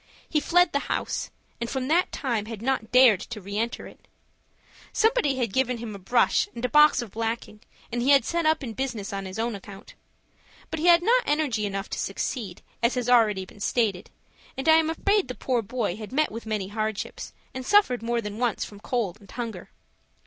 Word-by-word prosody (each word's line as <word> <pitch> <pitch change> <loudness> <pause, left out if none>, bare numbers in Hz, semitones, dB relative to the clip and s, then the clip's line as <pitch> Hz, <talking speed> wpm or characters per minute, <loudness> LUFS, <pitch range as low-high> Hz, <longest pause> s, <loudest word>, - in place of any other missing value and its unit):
He 305 - +1
fled 355 +4 +3
the 280 - +2
house, - - -2 0.3
and 235 -1 -3
from 260 -1 -2
that 340 +5 +2
time 230 -6 -2
had 225 -2 -6
not 255 -3 -1
dared 250 -6 +7
to 220 +1 -7
re 200 +1 -7
enter 230 +3 -2
it. - - -15 0.8
Somebody 445 - +2
had 240 -6 -2
given 250 -2 +1
him 230 -2 -6
a 200 - -8
brush 245 - +2
and 240 +1 -3
box 300 -4 +6
of 220 - -11
blacking, 225 -1 -4 0.3
and 240 +1 -1
he 255 - +1
had 275 -4 +6
set 340 -2 0
up 315 -2 +2
in 230 -4 -5
business 225 -5 -4
on 195 0 -4
his 185 - -7
own 230 +1 -1
account. 200 0 -11 0.8
But 320 - -3
he 335 - +1
had 345 0 +7
not - - +4
energy 280 -9 +1
enough 195 0 -4
to - - -3
succeed, 205 -9 -4 0.2
as 235 +2 +2
has 245 -1 -1
already 215 -6 +4
been 205 - -16
stated, 205 -4 0 0.5
and 265 +3 -4
I 320 0 +8
am 320 -1 +2
afraid 400 +5 +1
the 250 - -6
poor 250 -3 0
boy 215 -4 -2
had 215 0 -8
met 305 +3 +1
with 225 +1 -7
many 210 -3 -2
hardships, 215 0 -4 0.2
and 260 - -5
suffered 260 - +3
more 235 0 -1
than 210 0 -6
once 240 -4 0
from 205 - -12
cold 215 -4 -2
and 200 -2 -18
hunger. 230 -7 -6
235 Hz, 205 wpm, -26 LUFS, 210-275 Hz, 0.8 s, I